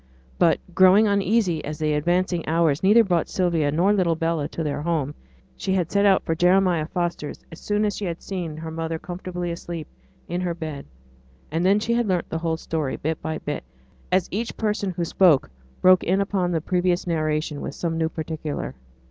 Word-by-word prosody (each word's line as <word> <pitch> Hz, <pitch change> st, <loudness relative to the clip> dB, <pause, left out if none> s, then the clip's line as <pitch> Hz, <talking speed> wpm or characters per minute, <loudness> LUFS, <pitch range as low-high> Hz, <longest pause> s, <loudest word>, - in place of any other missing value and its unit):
But, 165 Hz, -3 st, +4 dB, 0.2 s
growing 190 Hz, +4 st, +6 dB
uneasy 200 Hz, -4 st, +1 dB
as 150 Hz, +1 st, -5 dB
the 155 Hz, -1 st, 0 dB
advancing 175 Hz, +3 st, +1 dB
hours 160 Hz, -3 st, +2 dB
neither 210 Hz, +5 st, +6 dB
brought 175 Hz, -5 st, 0 dB
Sylvia 170 Hz, -5 st, +1 dB
nor 180 Hz, +7 st, +3 dB
little 180 Hz, -5 st, +2 dB
Bella 165 Hz, -2 st, -1 dB
to 165 Hz, -, -4 dB
their 145 Hz, -1 st, -2 dB
home, 150 Hz, -3 st, -1 dB, 0.4 s
she 190 Hz, -, -2 dB
had 180 Hz, -2 st, 0 dB
set 200 Hz, 0 st, +3 dB
out 190 Hz, -1 st, +4 dB
for 165 Hz, -, 0 dB
Jeremiah 180 Hz, -1 st, +3 dB
Foster's 170 Hz, -4 st, -3 dB
as 165 Hz, -, -10 dB
soon 210 Hz, 0 st, 0 dB
as 205 Hz, -, -1 dB
she 205 Hz, -, -4 dB
had 170 Hz, -2 st, -3 dB
seen 175 Hz, -5 st, -5 dB
her 160 Hz, 0 st, -6 dB
mother 165 Hz, 0 st, -3 dB
comfortably 175 Hz, 0 st, -5 dB
asleep 170 Hz, -2 st, -6 dB, 0.4 s
in 175 Hz, +1 st, -2 dB
her 175 Hz, -2 st, -2 dB
bed; 155 Hz, -4 st, -6 dB, 0.6 s
and 165 Hz, +2 st, 0 dB
then 195 Hz, +3 st, +4 dB
she 235 Hz, +2 st, -1 dB
had 235 Hz, -1 st, +1 dB
learnt 180 Hz, -3 st, 0 dB
the 160 Hz, -, -2 dB
whole 165 Hz, -1 st, -1 dB
story, 155 Hz, -4 st, -2 dB
bit 160 Hz, +1 st, -3 dB
by 160 Hz, 0 st, -3 dB
bit, -, -, -4 dB, 0.5 s
as 185 Hz, -1 st, +2 dB
each 225 Hz, +4 st, -3 dB
person 210 Hz, -2 st, -1 dB
who 175 Hz, -1 st, -2 dB
spoke 165 Hz, -5 st, +4 dB, 0.3 s
broke 185 Hz, 0 st, +6 dB
in 190 Hz, +3 st, +1 dB
upon 195 Hz, -3 st, 0 dB
the 165 Hz, -2 st, 0 dB
previous 180 Hz, +1 st, 0 dB
narration 155 Hz, -3 st, -1 dB
with -, -, -5 dB
some 165 Hz, -1 st, -2 dB
new 160 Hz, 0 st, +1 dB
particular. 155 Hz, -, -4 dB
170 Hz, 195 wpm, -24 LUFS, 160-185 Hz, 0.6 s, growing